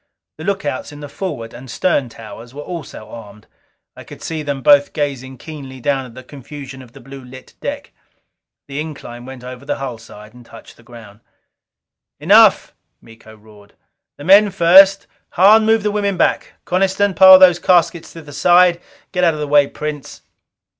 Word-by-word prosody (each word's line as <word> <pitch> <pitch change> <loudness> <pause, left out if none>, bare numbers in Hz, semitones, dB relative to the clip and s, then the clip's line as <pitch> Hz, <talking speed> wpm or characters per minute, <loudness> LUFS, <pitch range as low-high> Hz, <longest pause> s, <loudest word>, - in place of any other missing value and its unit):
The - - -8
lookouts 190 -9 -4
in 145 0 -12
the 145 - -8
forward 140 -8 -7
and 125 +2 -12
stern 140 -4 -1
towers 115 +2 -13
were 145 - -8
also 165 -11 -9
armed; 105 -2 -13 0.5
I - - -12
could - - -14
see 160 -1 -5
them 140 -3 -5
both 145 -1 +4
gazing 135 -3 -5
keenly 135 -3 -11
down 135 0 -2
at 115 - -17
the 130 - -11
confusion 140 0 -11
of 125 -2 -17
the - - -14
blue 135 +1 -12
lit 130 +1 -14
deck. - - -6 0.8
The 140 +1 -5
incline 130 -6 -10
went 130 -2 -11
over 125 +1 -10
the 145 +1 -3
hull 130 -4 -7
side 105 -1 -15
and 125 0 -16
touched - - -16
the - - -20
ground. 115 -3 -15 1.0
"Enough!" - - +4 0.3
Miko 110 -1 -17
roared. 105 -1 -20 0.4
"The - - -11
men 200 +5 +5
first. 195 +2 +5 0.3
Hahn, 215 +4 +4
move 225 -1 +2
the 210 - -1
women 200 -2 -2
back! - - -1
Coniston, 190 +2 0
pile 190 +2 +8
those 180 -2 +5
caskets 175 -2 +1
to 165 - -11
the 145 -1 -13
side. 175 +3 +3 0.3
Get 180 -1 -2
out 165 -3 +2
of - - -8
the 150 - -4
way, 145 -1 +3
Prince." 150 -1 -8
145 Hz, 180 wpm, -17 LUFS, 125-175 Hz, 1.0 s, pile